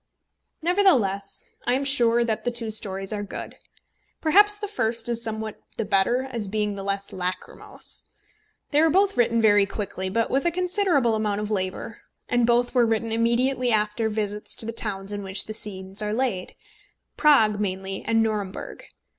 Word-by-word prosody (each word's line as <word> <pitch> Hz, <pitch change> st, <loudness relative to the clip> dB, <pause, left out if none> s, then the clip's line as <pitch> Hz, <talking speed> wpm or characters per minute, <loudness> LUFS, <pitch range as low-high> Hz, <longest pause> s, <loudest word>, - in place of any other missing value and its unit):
Nevertheless 260 Hz, -, +2 dB, 0.2 s
I 245 Hz, -, +3 dB
am 275 Hz, -, -1 dB
sure 240 Hz, -4 st, +3 dB
that 220 Hz, -2 st, -2 dB
the -, -, 0 dB
two 235 Hz, -2 st, -4 dB
stories 195 Hz, -1 st, -3 dB
are 205 Hz, -, -3 dB
good. 205 Hz, -, -7 dB, 0.7 s
Perhaps 410 Hz, +6 st, +4 dB
the 415 Hz, 0 st, -4 dB
first 230 Hz, -, -1 dB
is 235 Hz, -1 st, -2 dB
somewhat 220 Hz, -1 st, -4 dB, 0.2 s
the 225 Hz, -, -1 dB
better, 205 Hz, +6 st, +2 dB
as 235 Hz, -6 st, -4 dB
being 210 Hz, +1 st, -1 dB
the 200 Hz, -, -6 dB
less 200 Hz, 0 st, -3 dB
lachrymose. 180 Hz, 0 st, -4 dB, 0.6 s
They 295 Hz, 0 st, +4 dB
were 325 Hz, -, +5 dB
both 390 Hz, +4 st, +3 dB
written 230 Hz, -1 st, +2 dB
very 205 Hz, -2 st, +5 dB
quickly, 190 Hz, -2 st, -4 dB
but 230 Hz, +4 st, 0 dB
with 270 Hz, +4 st, +1 dB
a -, -, +4 dB
considerable 360 Hz, -, +2 dB
amount 210 Hz, -2 st, 0 dB
of 210 Hz, 0 st, -4 dB
labour; 190 Hz, +3 st, -3 dB, 0.3 s
and 245 Hz, -1 st, +2 dB
both 240 Hz, +1 st, +2 dB
were 245 Hz, -3 st, +4 dB
written 225 Hz, 0 st, 0 dB
immediately 245 Hz, +3 st, +1 dB
after 215 Hz, +1 st, +1 dB
visits 210 Hz, -1 st, -2 dB
to -, -, +1 dB
the 230 Hz, -, -4 dB
towns 200 Hz, -3 st, -1 dB
in 205 Hz, -, -4 dB
which 190 Hz, 0 st, +1 dB
the 215 Hz, -, -6 dB
scenes 195 Hz, -2 st, -2 dB
are 210 Hz, 0 st, -2 dB
laid, 230 Hz, -7 st, -2 dB, 0.6 s
Prague, 225 Hz, -9 st, +4 dB
mainly, 190 Hz, -1 st, -3 dB
and 225 Hz, 0 st, +2 dB
Nuremberg. 210 Hz, -4 st, -4 dB
220 Hz, 170 wpm, -24 LUFS, 205-245 Hz, 0.7 s, were